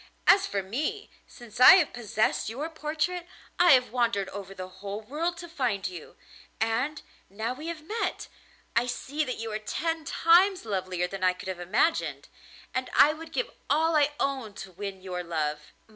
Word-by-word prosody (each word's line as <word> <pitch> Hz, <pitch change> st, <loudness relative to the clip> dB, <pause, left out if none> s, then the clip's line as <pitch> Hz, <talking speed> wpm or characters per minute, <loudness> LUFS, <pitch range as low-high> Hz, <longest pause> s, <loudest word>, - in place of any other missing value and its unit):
As 390 Hz, -, +6 dB
for 200 Hz, -1 st, -2 dB
me, 300 Hz, -, -3 dB, 0.2 s
since 240 Hz, -2 st, -12 dB
I 255 Hz, +9 st, +11 dB
have 350 Hz, -6 st, +2 dB
possessed 220 Hz, -2 st, 0 dB
your 290 Hz, +8 st, -4 dB
portrait 320 Hz, +3 st, -2 dB, 0.3 s
I 350 Hz, -2 st, +8 dB
have 255 Hz, -1 st, +3 dB
wandered 235 Hz, -5 st, 0 dB
over 195 Hz, -1 st, -8 dB
the 185 Hz, -1 st, -6 dB
whole 200 Hz, +3 st, -7 dB
world 320 Hz, +9 st, -2 dB
to 345 Hz, -, -8 dB
find 245 Hz, -, -1 dB
you, 180 Hz, -4 st, -9 dB, 0.4 s
and, 240 Hz, +8 st, -1 dB, 0.3 s
now 220 Hz, +5 st, -3 dB
we 300 Hz, +5 st, -8 dB
have 330 Hz, -2 st, -5 dB
met, 435 Hz, +8 st, -3 dB, 0.5 s
I 235 Hz, +1 st, +3 dB
see 280 Hz, +5 st, -2 dB
that 255 Hz, -4 st, -4 dB
you 225 Hz, 0 st, -5 dB
are 215 Hz, -, -2 dB
ten 325 Hz, +9 st, -2 dB
times 350 Hz, +3 st, +4 dB
lovelier 185 Hz, -4 st, -1 dB
than 190 Hz, +1 st, -6 dB
I 185 Hz, 0 st, +4 dB
could 185 Hz, +1 st, -8 dB
have 185 Hz, -2 st, -4 dB
imagined, 210 Hz, -, 0 dB, 0.4 s
and 255 Hz, 0 st, -2 dB
I 300 Hz, -, +7 dB
would 325 Hz, +1 st, -10 dB
give -, -, -2 dB, 0.2 s
all 320 Hz, +2 st, +3 dB
I 295 Hz, -1 st, +3 dB
own 260 Hz, -7 st, -2 dB
to 190 Hz, -, -16 dB
win 190 Hz, 0 st, -7 dB
your 180 Hz, -1 st, -4 dB
love. 150 Hz, -3 st, -3 dB
245 Hz, 180 wpm, -28 LUFS, 195-310 Hz, 0.5 s, I